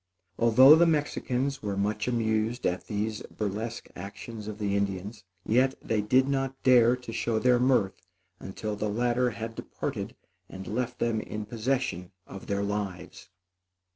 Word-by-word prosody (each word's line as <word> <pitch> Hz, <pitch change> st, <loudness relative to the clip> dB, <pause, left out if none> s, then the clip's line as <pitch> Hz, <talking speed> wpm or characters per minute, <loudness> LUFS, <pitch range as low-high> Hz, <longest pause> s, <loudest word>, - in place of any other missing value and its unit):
Although 130 Hz, +6 st, +8 dB
the 170 Hz, +1 st, +5 dB
Mexicans 140 Hz, -3 st, -1 dB
were 100 Hz, -2 st, -3 dB
much 105 Hz, +2 st, -1 dB
amused 115 Hz, 0 st, 0 dB
at 90 Hz, +1 st, -1 dB
these 105 Hz, +1 st, -2 dB
burlesque 110 Hz, +3 st, -4 dB
actions 105 Hz, +3 st, -8 dB
of 105 Hz, -1 st, -5 dB
the 100 Hz, -2 st, -1 dB
Indians, 100 Hz, +2 st, -3 dB, 0.2 s
yet 130 Hz, +4 st, +3 dB
they 110 Hz, -2 st, -1 dB
did 130 Hz, +5 st, +3 dB
not 135 Hz, -1 st, -1 dB
dare 125 Hz, -2 st, +6 dB
to 125 Hz, -2 st, -9 dB
show 115 Hz, 0 st, 0 dB
their 125 Hz, +2 st, +3 dB
mirth 125 Hz, -7 st, +2 dB, 0.4 s
until 105 Hz, +2 st, -5 dB
the 105 Hz, +1 st, -2 dB
latter 120 Hz, +3 st, +1 dB
had 115 Hz, 0 st, -6 dB
departed -, -, -5 dB, 0.3 s
and 95 Hz, 0 st, -8 dB
left 125 Hz, +4 st, -3 dB
them 115 Hz, -3 st, 0 dB
in 105 Hz, 0 st, -6 dB
possession 110 Hz, -5 st, -2 dB
of 100 Hz, -, -10 dB
their 100 Hz, 0 st, -1 dB
lives. 100 Hz, -3 st, -5 dB
110 Hz, 150 wpm, -28 LUFS, 105-125 Hz, 0.4 s, Although